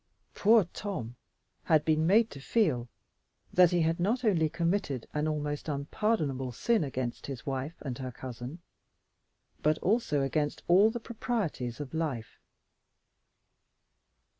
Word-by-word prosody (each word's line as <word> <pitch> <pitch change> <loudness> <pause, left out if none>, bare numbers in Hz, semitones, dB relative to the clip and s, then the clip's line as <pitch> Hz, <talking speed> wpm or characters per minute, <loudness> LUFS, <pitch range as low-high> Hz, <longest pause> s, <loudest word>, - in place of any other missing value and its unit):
Poor 220 +1 +5
Tom 125 - -5 0.5
had 155 -2 +3
been 155 0 +2
made 220 +4 +4
to 140 - -9
feel 135 - +1 0.7
that 180 -1 +7
he 175 0 +2
had 165 +1 +1
not 230 +8 +1
only 165 -7 +3
committed 170 - -1
an 150 +1 0
almost 150 0 -2
unpardonable 140 - -1
sin 225 - +1
against 130 -3 -4
his 135 -4 -6
wife 135 +4 -3
and 135 -3 -5
her 130 -1 -4
cousin, 130 +6 -8 1.0
but 155 +1 +3
also 185 - +1
against 145 +2 -1
all 195 +5 +6
the 240 +2 -4
proprieties 215 - -3
of 145 -1 -6
life. 145 -9 -3
155 Hz, 130 wpm, -30 LUFS, 135-195 Hz, 1.0 s, that